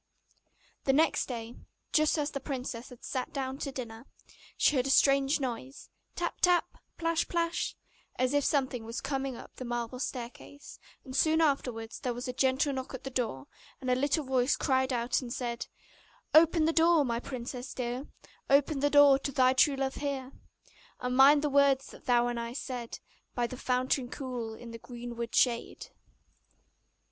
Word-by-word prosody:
The 270 - +3
next 315 +4 +2
day, 235 -1 -6 0.4
just 310 +1 +3
as 295 -1 -1
the 275 - -4
princess 255 -3 -5
had 250 -2 -14
sat 255 -1 -3
down 270 -1 -4
to 275 - -3
dinner, 235 -2 -7 0.5
she 300 - +3
heard 255 0 +1
a - - -2
strange 275 +1 +4
noise 260 +1 -5 0.2
tap, - - -3
tap 355 -1 +2 0.2
plash, 330 0 0
plash 340 -1 -1 0.4
as 255 +1 0
if 285 0 +3
something 260 -5 0
was 230 +2 -5
coming 270 -2 -3
up - - -12
the - - -6
marble 240 0 -4
staircase: 260 +2 -7 0.3
and 260 -1 -8
soon 315 +3 +3
afterwards 250 -7 0
there 250 -4 -2
was 245 +2 -5
a 250 - -3
gentle 265 +2 +1
knock 260 0 -5
at 260 - -9
the 270 - -6
door, 230 - -2 0.3
and 255 -2 -2
a - - +4
little 285 +4 +1
voice 260 0 +2
cried 260 -2 +1
out 240 +1 0
and 245 -2 -7
said: 240 -1 -3 0.7
'Open 320 0 +6
the 325 - +2
door, 325 -2 +4
my 235 -2 -1
princess 250 0 -6
dear, 250 +2 -4 0.4
Open 280 +1 +3
the 290 +1 +2
door 285 -2 +7
to 280 - -3
thy 255 -1 +4
true 275 +2 +4
love 270 0 -1
here! 275 -2 -3 0.7
And 250 0 -2
mind 285 +3 +7
the - - +2
words 275 -1 +4
that - - -15
thou 240 -2 +3
and 240 -1 -2
I 235 0 -4
said 245 -3 -5 0.4
By 245 - +1
the 245 - -5
fountain 255 0 0
cool, 245 -5 -5
in 235 +1 -10
the 230 - -8
greenwood 235 -1 -6
shade. 235 -2 +1
260 Hz, 175 wpm, -30 LUFS, 245-280 Hz, 0.7 s, door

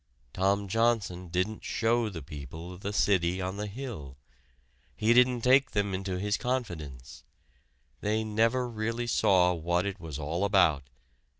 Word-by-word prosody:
Tom 100 +2 +1
Johnson 105 -4 0
didn't 90 +5 -2
show 115 0 +1
the 85 -7 -7
people 80 +5 -8
the 100 +3 -5
City 95 -3 +2
on 95 +1 -3
the 105 +1 -3
Hill. 100 - -7 0.8
He 110 +2 +3
didn't 125 0 +4
take 130 +3 +4
them 100 -1 0
into 95 -1 -3
his 105 +2 0
confidence. 80 - -4 0.8
They 110 - 0
never 115 +4 +1
really 115 +1 -3
saw 95 -6 +3
what 85 +2 0
it 100 0 -4
was 80 -5 -6
all 80 +5 -2
about. 85 -9 +3
100 Hz, 140 wpm, -29 LUFS, 85-115 Hz, 0.8 s, didn't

